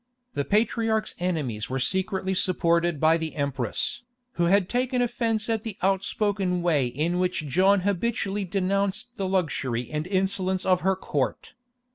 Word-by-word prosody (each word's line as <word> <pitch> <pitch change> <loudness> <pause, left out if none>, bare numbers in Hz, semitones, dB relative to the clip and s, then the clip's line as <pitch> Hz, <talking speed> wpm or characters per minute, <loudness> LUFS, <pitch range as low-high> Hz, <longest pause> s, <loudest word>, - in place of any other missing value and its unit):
The 140 - -1
patriarch's 220 +1 +1
enemies 145 -12 -2
were 130 - -1
secretly 190 - 0
supported 170 -3 +1
by 160 +2 +4
the 160 -1 -4
empress, 140 -6 -1 0.3
who 175 - 0
had 190 +1 +3
taken 250 +2 0
offence 230 -3 0
at 225 -2 0
the 220 -3 -6
outspoken 195 -1 0
way 150 -7 +2
in 160 +8 -1
which 180 -4 0
John 190 +7 +4
habitually 200 +1 -1
denounced 195 +3 -1
the 195 - -1
luxury 135 -10 -1
and 150 +2 -2
insolence 190 -1 0
of 185 -1 +3
her 190 +1 +2
court. 145 -8 -3
185 Hz, 145 wpm, -26 LUFS, 160-200 Hz, 0.3 s, by